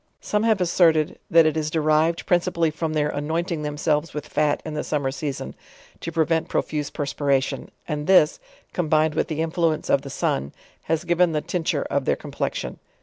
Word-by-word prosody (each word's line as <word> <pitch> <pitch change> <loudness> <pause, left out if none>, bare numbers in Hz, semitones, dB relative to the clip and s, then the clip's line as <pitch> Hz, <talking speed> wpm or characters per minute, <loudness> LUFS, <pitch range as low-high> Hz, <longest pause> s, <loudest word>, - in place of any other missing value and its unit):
Some 210 - -1
have 220 -2 +3
asserted, 165 -3 +3
that 165 -1 +6
it 155 - +2
is 155 -1 -1
derived 155 +1 +2
prin 175 - +4
cipally 170 -3 0
from 160 0 -2
their 150 -1 +1
annointing 160 +3 -2
themselves 150 +1 -1
with 150 - -4
fat 150 -1 +1
in 155 - -5
the 150 - -2
summer 140 -3 -1
season, 140 0 -4 0.5
to 165 - -5
prevent 160 0 +1
profuse 150 -1 -1
perspiration, 140 -2 -1 0.2
and 150 0 -3
this, 180 -5 +5 0.3
combined 155 -2 +2
with - - 0
the 155 0 -2
influence 165 -1 0
of 135 - +4
the 140 - -8
sun, 70 - -1 0.3
has 160 +1 0
given 175 -1 +2
the 150 - 0
tinc 175 -3 -3
ture - - +1
of - - -1
their - - +2
complexion. - - -4
155 Hz, 185 wpm, -23 LUFS, 150-165 Hz, 0.5 s, that